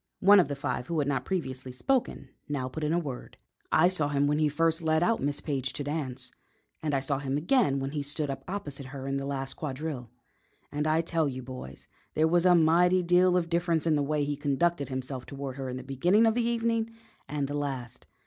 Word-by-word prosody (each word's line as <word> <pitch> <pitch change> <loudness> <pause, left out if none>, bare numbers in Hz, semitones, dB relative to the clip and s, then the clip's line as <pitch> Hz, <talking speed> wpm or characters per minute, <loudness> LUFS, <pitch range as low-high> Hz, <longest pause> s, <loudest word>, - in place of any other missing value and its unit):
One 200 +1 +8
of 175 - +4
the 145 - -3
five 130 -3 -3
who 170 - -2
had 145 -2 +1
not 135 -3 -1
previously 130 -8 -3
spoken 235 - -1 0.2
now 135 -3 -1
put 155 +5 -5
in 150 - +1
a 170 - +2
word: 140 -7 -5 0.3
"I 165 +3 +6
saw 180 -5 +1
him 140 -1 +2
when 150 +1 +2
he 155 -1 +3
first 165 +2 +1
led 160 0 +2
out 225 +6 +2
Miss 145 0 -1
Page 135 -3 -2
to 145 - -4
dance, 135 -4 -3 0.5
and 150 -2 0
I - - +3
saw 135 0 -1
him 135 0 -1
again 170 - +2
when 135 0 -3
he 150 -1 -2
stood 145 0 -2
up 135 0 -6
opposite 145 -8 -5
her 135 0 -7
in 135 0 -1
the 135 0 -3
last 135 -1 -3
quadrille, 140 -4 -5 0.6
and 150 +1 -1
I 155 +1 +3
tell 165 -2 0
you, 130 -1 -6
boys, 125 - -9 0.3
there 155 +1 +4
was 175 +2 +3
a 180 - +7
mighty 175 +3 +4
deal 180 +1 +4
of 170 -2 0
difference 170 -1 +1
in 160 -2 +3
the 145 - +2
way 150 +1 0
he 145 0 -1
conducted 145 +2 0
himself 130 -1 -5
toward 140 -2 -6
her 135 -1 -4
in 125 - -4
the 130 - -7
beginning 175 - +3
of 225 - +4
the 235 0 +1
evening 230 -1 0 0.4
and 145 -1 -1
the 145 - -5
last. 130 -4 -4
145 Hz, 230 wpm, -29 LUFS, 135-170 Hz, 0.6 s, One